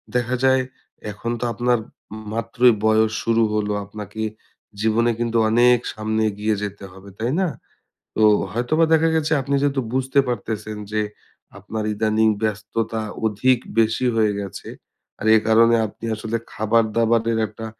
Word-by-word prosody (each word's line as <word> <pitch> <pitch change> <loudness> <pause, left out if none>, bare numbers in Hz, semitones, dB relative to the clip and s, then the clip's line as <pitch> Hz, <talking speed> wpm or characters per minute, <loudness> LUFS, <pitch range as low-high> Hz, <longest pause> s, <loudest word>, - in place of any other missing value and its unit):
দেখা 125 +1 0
যায় 130 0 +4 0.5
এখন 115 +3 -5
তো 125 - -2
আপনার 120 +1 +1
ম - - -12 0.5
মাত্রই 115 +2 +3
বয়স 110 0 +3
শুরু 115 0 +2
হলো। 105 -1 0
আপনাকে 105 +1 -8 0.6
জীবনে 115 +2 +2
কিন্তু 115 -1 0
অনেক 120 +2 +5 0.2
সামনে 110 +1 -2
এগিয়ে 105 +1 -1
যেতে 100 -1 -6
হবে, 95 +2 -13
তাই 115 +3 -1
না? 185 - +2 0.7
তো - - 0 0.3
হয়তোবা 155 +8 +1
দেখা 160 +1 +4
গেছে 160 0 0
আপনি 140 +1 -1
যেহেতু 140 -2 +1
বুঝতে 130 +1 +1
পারতেছেন 110 -3 -4
যে 110 - 0 0.6
আপনার 105 +2 -5
ইদানিং 110 +1 +2
ব্যস্ততা 110 +1 -2 0.2
অধিক 120 +4 +2 0.2
বেশি 110 +3 +2
হয়ে 110 -2 +3
গেছে। 100 -3 -7 0.5
আর - - -5
এ - - +7
কারণে 115 +1 +5
আপনি 110 - -10
আসলে 110 +1 -3 0.2
খাবার-দাবারের 115 +1 +1
একটা 110 +1 -9
110 Hz, 145 wpm, -21 LUFS, 110-120 Hz, 0.7 s, এ